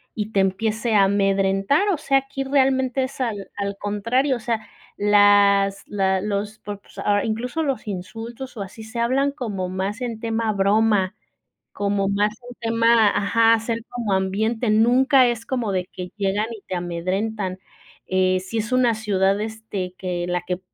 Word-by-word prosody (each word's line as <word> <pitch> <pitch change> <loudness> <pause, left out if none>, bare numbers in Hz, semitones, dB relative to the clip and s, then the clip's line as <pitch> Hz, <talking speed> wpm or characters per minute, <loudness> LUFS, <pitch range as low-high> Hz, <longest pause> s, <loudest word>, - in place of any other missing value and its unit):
y 215 0 -3
te 195 - +3
empiece 220 +4 0
a 200 - +6
amedrentar, 195 - +2
o - - -1
sea, 275 -2 +2
aquí 270 0 -5
realmente 265 -1 +2
es 260 +1 -5
al 210 -5 -3
al 200 0 -3
contrario, 230 +7 0
o - - -10
sea, 225 -1 -2 0.3
las 205 -1 +4
la 190 -2 +1
los 210 +1 -3
por 205 -1 -7
s 200 - -10
ah 205 -1 +2
incluso 245 +7 -2
los 270 -6 -2
insultos 225 +7 -7
o - - -4
así 200 +3 -8
se 220 +2 -7
hablan 265 +4 +2
como 210 -10 -4
más 190 +5 -3
en 235 -3 -4
tema 225 -1 -1
broma, 200 -1 +2 0.6
como 200 -1 0
más 205 +1 +1 0.2
en - - -9
tema 230 -1 +4
ajá, 225 +3 +3
hacer 225 +1 -1
como 235 -4 -3
ambiente, 215 +5 0
nunca 250 +5 +5
es 235 -1 -3
como 240 -6 -1
de 185 -1 -1
que 180 -1 -7
llegan 205 +1 0
y 220 - -8
te - - -3
amedrentan, 185 +3 -2 0.5
eh, 185 0 +2
si 190 +5 -4
es 225 +3 -3
una 250 -2 +3
ciudad, 200 -2 +1
este, 215 -4 -5
que 180 -1 -3
la 180 -1 -1
que 180 0 -2
210 Hz, 170 wpm, -22 LUFS, 195-235 Hz, 0.6 s, a